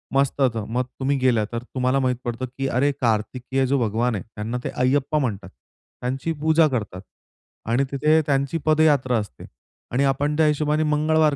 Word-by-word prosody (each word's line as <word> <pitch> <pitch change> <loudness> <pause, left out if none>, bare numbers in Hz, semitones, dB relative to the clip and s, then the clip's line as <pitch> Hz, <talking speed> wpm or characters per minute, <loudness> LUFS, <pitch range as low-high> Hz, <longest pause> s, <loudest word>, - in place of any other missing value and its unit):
मस्त 140 0 +1
होतं. 115 -5 +1
मग 125 +2 0 0.2
तुम्ही 135 +1 +1
गेलात, 120 -5 +2
तर 120 0 -4
तुम्हाला 130 +2 0
माहीत 130 -1 +1
पडतं, 120 +2 -3
की 135 0 -1
अरे 135 +3 +2
कार्तिकेय 125 +3 0
जो 140 - +2
भगवान 115 +1 0
आहे, 100 - -4
त्यांना 110 +4 -3
ते - - -2
अय्यप्पा 135 +4 +1
म्हणतात. 105 -7 -3 0.5
त्यांची 130 +6 -2
पूजा 160 +1 +3
करतात 105 -8 -3 0.7
आणि 125 +4 +2
तिथे 155 +3 +3
त्यांची 140 +2 0
पदयात्रा 150 -6 +3
असते. 100 - -8 0.5
आणि 130 +3 +1
आपण 145 +2 0
त्या 160 - +4
हिशोबाने 150 +1 +1
मंगळवार 155 0 +2
135 Hz, 170 wpm, -23 LUFS, 120-150 Hz, 0.7 s, त्या